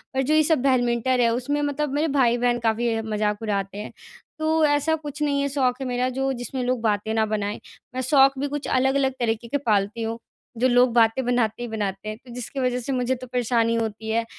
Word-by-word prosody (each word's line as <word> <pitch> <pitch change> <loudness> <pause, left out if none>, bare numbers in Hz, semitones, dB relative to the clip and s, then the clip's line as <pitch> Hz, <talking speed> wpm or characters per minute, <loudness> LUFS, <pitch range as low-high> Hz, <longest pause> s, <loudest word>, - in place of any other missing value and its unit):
और 265 - +2
जो 275 +4 +1
ये 310 0 +5
सब 310 -3 +2
बैडमिंटन 250 -1 +2
है 235 -1 +4
उसमें 285 +5 -1
मतलब 290 0 -1
मेरे 300 +3 +1
भाई-बहन 245 -3 +2
काफ़ी 225 0 0
मज़ाक 210 -1 -1
उड़ाते 200 -2 -2
हैं 210 - -6 0.5
तो 315 0 +2
ऐसा 290 +2 +2
कुछ 300 -1 -8
नहीं 285 -1 +1
है 280 - 0
शौक 260 -3 +1
है - - -2
मेरा 250 0 0
जो 270 +1 -1
जिसमें 250 +1 -4
लोग 250 -1 -1
बातें 215 -1 0
न 220 - +3
बनाएँ। 210 -1 -2 0.4
मैं 255 - -1
शौक 270 +1 +4
भी 285 - -1
कुछ 290 0 -4
अलग-अलग 265 +1 +2
तरीक़े 230 -1 -1
के 285 - 0
पालती 215 -4 0
हूँ 225 +1 -3 0.4
जो 250 +3 +3
लोग 245 -1 +4
बातें 230 +2 +3
बनाते 240 -2 0
ही - - -4
बनाते 205 -2 -3
हैं 215 - -5
तो 245 - -11
जिसकी 250 +3 -6
वज़ह 250 -1 0
से 250 +3 -4
मुझे 255 0 0
तो 255 0 -10
परेशानी 235 -2 +1
होती 220 -1 -3
है। 230 +1 0
245 Hz, 220 wpm, -24 LUFS, 225-270 Hz, 0.5 s, ये